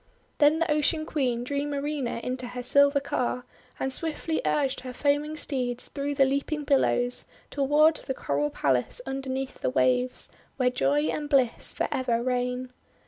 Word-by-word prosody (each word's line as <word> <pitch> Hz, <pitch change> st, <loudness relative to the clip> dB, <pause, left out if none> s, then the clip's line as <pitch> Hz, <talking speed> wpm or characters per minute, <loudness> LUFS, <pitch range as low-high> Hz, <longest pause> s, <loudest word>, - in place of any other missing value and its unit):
Then 295 Hz, +1 st, +5 dB
the 330 Hz, -1 st, 0 dB
Ocean 305 Hz, +1 st, +2 dB
Queen 250 Hz, -6 st, -1 dB
drew 280 Hz, +3 st, -2 dB
Marina 285 Hz, -4 st, -2 dB
into 255 Hz, 0 st, -3 dB
her 250 Hz, 0 st, -6 dB
silver 280 Hz, +2 st, +4 dB
car, 250 Hz, -2 st, -2 dB, 0.3 s
and 265 Hz, 0 st, -1 dB
swiftly 320 Hz, +1 st, 0 dB
urged 275 Hz, -3 st, +1 dB
her 255 Hz, 0 st, -7 dB
foaming 290 Hz, +3 st, 0 dB
steeds 250 Hz, -5 st, -2 dB
through 285 Hz, 0 st, -3 dB
the 270 Hz, -, +5 dB
leaping 280 Hz, +3 st, -1 dB
billows 250 Hz, -3 st, +2 dB, 0.3 s
toward 295 Hz, +3 st, +4 dB
the 265 Hz, -, -5 dB
coral 145 Hz, -, -1 dB
palace 130 Hz, -4 st, 0 dB
underneath 270 Hz, 0 st, -4 dB
the -, -, +1 dB
waves, 125 Hz, -1 st, +1 dB, 0.3 s
where 250 Hz, -2 st, +2 dB
joy 280 Hz, +3 st, +2 dB
and 295 Hz, -1 st, -3 dB
bliss 265 Hz, -5 st, +2 dB
for -, -, -1 dB
ever 240 Hz, -3 st, 0 dB
reign. 250 Hz, 0 st, -1 dB
270 Hz, 155 wpm, -27 LUFS, 250-290 Hz, 0.3 s, Then